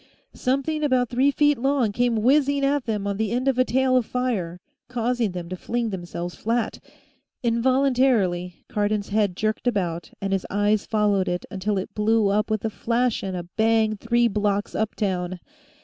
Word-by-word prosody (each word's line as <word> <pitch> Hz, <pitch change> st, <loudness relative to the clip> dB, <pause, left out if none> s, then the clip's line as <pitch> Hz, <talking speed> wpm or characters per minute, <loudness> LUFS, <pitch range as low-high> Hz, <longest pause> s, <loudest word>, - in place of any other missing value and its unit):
Something 275 Hz, +4 st, -1 dB
about 255 Hz, -4 st, +2 dB
three 260 Hz, +3 st, +3 dB
feet 290 Hz, -2 st, +2 dB
long 265 Hz, -4 st, +1 dB
came 235 Hz, 0 st, +1 dB
whizzing 280 Hz, +2 st, +3 dB
at 280 Hz, -1 st, +1 dB
them 210 Hz, -3 st, -2 dB
on 200 Hz, -1 st, -2 dB
the 220 Hz, -1 st, 0 dB
end 250 Hz, +4 st, -1 dB
of 260 Hz, -2 st, +2 dB
a -, -, +6 dB
tail 260 Hz, +1 st, +2 dB
of 250 Hz, -, +4 dB
fire, 215 Hz, -9 st, -2 dB, 0.3 s
causing 240 Hz, -3 st, -1 dB
them 175 Hz, -2 st, -5 dB
to 185 Hz, -, -4 dB
fling 230 Hz, +4 st, -2 dB
themselves 175 Hz, -1 st, -5 dB
flat; 230 Hz, +2 st, -2 dB, 0.6 s
involuntarily, 235 Hz, -7 st, +1 dB
Cardon's 205 Hz, 0 st, -1 dB
head 205 Hz, -3 st, +1 dB
jerked 215 Hz, +4 st, -1 dB
about 175 Hz, -7 st, -1 dB
and 195 Hz, 0 st, -2 dB
his 195 Hz, -, -1 dB
eyes 205 Hz, +1 st, +1 dB
followed 205 Hz, -3 st, +1 dB
it 180 Hz, 0 st, -2 dB
until 200 Hz, +1 st, -1 dB
it 190 Hz, -, -4 dB
blew 215 Hz, 0 st, +2 dB
up 210 Hz, +2 st, +1 dB
with 215 Hz, 0 st, -1 dB
a 220 Hz, -, -1 dB
flash 235 Hz, +2 st, 0 dB
and 190 Hz, -2 st, -4 dB
a 175 Hz, -, -4 dB
bang 220 Hz, -1 st, +3 dB
three 235 Hz, +3 st, +2 dB
blocks 205 Hz, -1 st, -1 dB
uptown. 185 Hz, -4 st, -2 dB
220 Hz, 175 wpm, -24 LUFS, 200-250 Hz, 0.6 s, a